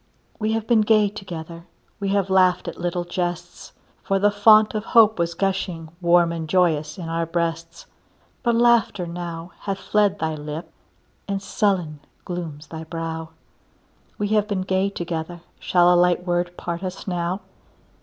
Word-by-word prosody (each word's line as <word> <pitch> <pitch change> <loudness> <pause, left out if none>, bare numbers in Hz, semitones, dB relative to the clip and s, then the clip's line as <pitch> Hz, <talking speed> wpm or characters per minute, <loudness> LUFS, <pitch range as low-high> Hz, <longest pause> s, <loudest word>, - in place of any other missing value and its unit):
We 215 0 0
have 225 -1 -1
been 230 -2 +4
gay 215 -1 +4
together; 170 -4 -8 0.3
We 200 -1 -2
have 195 -1 0
laughed 185 -1 +3
at - - -6
little 175 0 -1
jests; 175 -1 -4 0.3
For 195 -2 0
the 205 +1 +3
fount 215 +1 +6
of 215 -1 -2
hope 220 -4 +5
was 170 0 0
gushing 185 -4 -2
Warm 170 -1 +4
and 165 -2 -5
joyous 155 -3 +1
in 175 -3 -6
our 165 0 -1
breasts, 165 0 -3 0.6
But 235 -2 +1
laughter 235 -5 +3
now 170 0 -6
hath 195 -1 -3
fled 205 0 +1
thy 160 -4 -2
lip, 150 +2 -6 0.6
And 200 -1 -1
sullen 185 -6 -1 0.3
glooms 165 -4 -6
thy 160 0 -8
brow; 160 0 -5 0.9
We 205 0 -1
have 210 -1 +2
been 195 -3 -1
gay 190 +1 +1
together, 170 -2 -5 0.2
Shall 175 0 +4
a - - +4
light 180 0 +3
word 175 0 -1
part 170 0 -4
us 185 -1 -5
now? 180 +1 -2
180 Hz, 160 wpm, -23 LUFS, 170-200 Hz, 0.9 s, fount